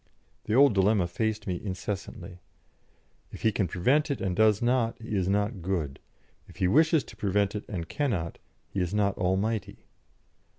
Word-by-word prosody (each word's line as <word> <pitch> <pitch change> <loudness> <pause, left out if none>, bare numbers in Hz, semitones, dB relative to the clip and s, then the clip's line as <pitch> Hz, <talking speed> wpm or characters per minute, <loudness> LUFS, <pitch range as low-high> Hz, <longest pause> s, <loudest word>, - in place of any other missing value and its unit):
The 110 - 0
old 140 -2 +6
dilemma 100 -1 +3
faced 110 +5 -2
me 90 -2 -3
incessantly: 95 -1 -5 0.9
"If - - -10
He 110 - +4
can 100 -2 0
prevent 130 - +2
it 140 - -1
and 95 -2 -1
does 110 0 +4
not, 120 -1 +1
He 110 -2 -5
is 95 -1 +1
not 100 0 0
good; 80 -7 -2 0.5
if - - -15
He 90 - +1
wishes 155 - +4
to - - -13
prevent 100 -1 0
it 105 - -5
and 85 -5 -4
cannot, 105 - -2 0.3
He 100 - -2
is 90 +3 -2
not 100 -2 +2
almighty." 95 +4 -1
100 Hz, 170 wpm, -28 LUFS, 95-110 Hz, 0.9 s, old